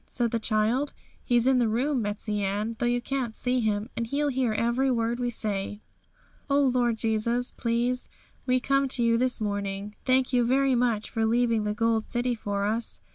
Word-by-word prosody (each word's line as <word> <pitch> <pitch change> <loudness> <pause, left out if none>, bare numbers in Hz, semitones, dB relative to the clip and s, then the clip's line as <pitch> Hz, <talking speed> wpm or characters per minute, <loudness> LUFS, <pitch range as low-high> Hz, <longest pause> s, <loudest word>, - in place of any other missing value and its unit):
said 235 -3 -1
the 230 - 0
child. 225 +6 0 0.3
'He's 240 -2 +2
in 260 -1 +4
the 240 - +2
room, 250 +4 0
Betsey 210 0 -2
Ann, 205 +3 -2
though 240 - +1
you 245 0 +1
can't 250 -4 -3
see 250 0 0
Him, 215 -2 0
and 230 - -2
He'll 290 +4 0
hear 255 -3 0
every 235 +5 +1
word 235 -1 0
we 245 -1 0
say.' 205 -3 -2 0.7
'O 280 +1 +3
Lord 245 -4 +2
Jesus, 230 +2 +1
please, 240 +2 -1 0.4
we 255 0 +3
come 275 +1 +1
to 255 -2 0
you 230 0 +3
this 255 0 0
morning. 200 -1 -3
Thank 255 0 +2
you 245 -1 +4
very 265 +2 +2
much 235 -3 0
for 225 - -1
leaving 230 -2 +2
the 210 0 -1
Gold 225 0 0
City 245 0 0
for 205 -3 -2
us. 225 +2 -2
235 Hz, 190 wpm, -27 LUFS, 215-250 Hz, 0.7 s, in